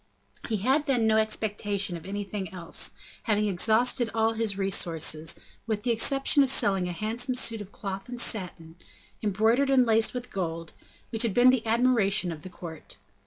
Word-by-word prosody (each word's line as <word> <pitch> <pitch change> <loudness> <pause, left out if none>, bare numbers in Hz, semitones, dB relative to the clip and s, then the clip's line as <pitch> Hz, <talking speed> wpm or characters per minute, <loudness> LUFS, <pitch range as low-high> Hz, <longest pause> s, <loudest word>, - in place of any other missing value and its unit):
He 220 - 0
had 265 +9 +1
then 245 -5 +2
no 220 0 +3
expectation 205 -3 -1
of 170 +1 -9
anything 200 -2 -5
else, 175 -3 -1 0.4
having 210 0 +2
exhausted 225 +5 +2
all 225 0 +2
his 220 -3 -1
resources, 165 -4 0 0.3
with 215 -2 -2
the 240 - +1
exception 270 +5 +2
of 270 - +2
selling 195 -7 +3
a - - -3
handsome 230 +8 -1
suit 230 -3 +1
of 205 -1 -10
cloth 195 +2 -6
and 245 -1 -6
satin, 175 -7 -4 0.4
embroidered 220 +7 +2
and 260 -2 +4
laced 225 +1 +2
with 250 0 -6
gold, 165 -3 -4 0.4
which 225 -2 -1
had 230 -5 +1
been 250 +1 +6
the 255 -3 0
admiration 220 -6 +2
of 155 -2 -8
the 185 - -9
court. 170 -3 -11
215 Hz, 170 wpm, -27 LUFS, 190-235 Hz, 0.4 s, been